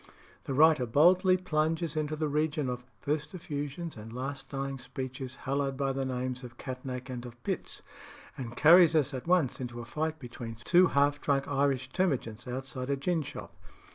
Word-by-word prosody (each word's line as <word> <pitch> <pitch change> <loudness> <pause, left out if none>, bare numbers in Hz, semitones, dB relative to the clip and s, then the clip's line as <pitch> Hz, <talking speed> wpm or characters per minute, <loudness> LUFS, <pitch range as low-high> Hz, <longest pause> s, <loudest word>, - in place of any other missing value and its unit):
The 135 - -2
writer 150 -3 +5
boldly 180 - +5
plunges 160 -2 0
into 155 0 -1
the 155 0 -1
region 150 -1 0
of 125 0 -5
"first 150 +5 -2
effusions 150 0 -4
and 110 0 -9
last 135 +3 -5
dying 135 -1 -3
speeches, 130 +1 -6
hallowed 135 0 0
by 135 -1 0
the 135 0 -1
names 125 0 -3
of 120 -1 -10
Catnach 130 -1 -6
and 125 -2 -5
of 120 -1 -10
Pitts," - - -2 0.5
and 120 -2 -7
carries 170 +1 +7
us 145 -2 +2
at 130 +4 -5
once 175 -7 +2
into 120 -1 -5
a 120 - -6
fight 155 +5 -2
between 120 -4 -7
two 180 +5 +6
half 145 0 +2
drunk 140 -2 +1
Irish 135 -2 +1
termagants 130 - -1
outside 130 +1 -4
a 140 - +1
gin 165 +4 0
shop. 140 - -8
140 Hz, 175 wpm, -30 LUFS, 125-155 Hz, 0.5 s, carries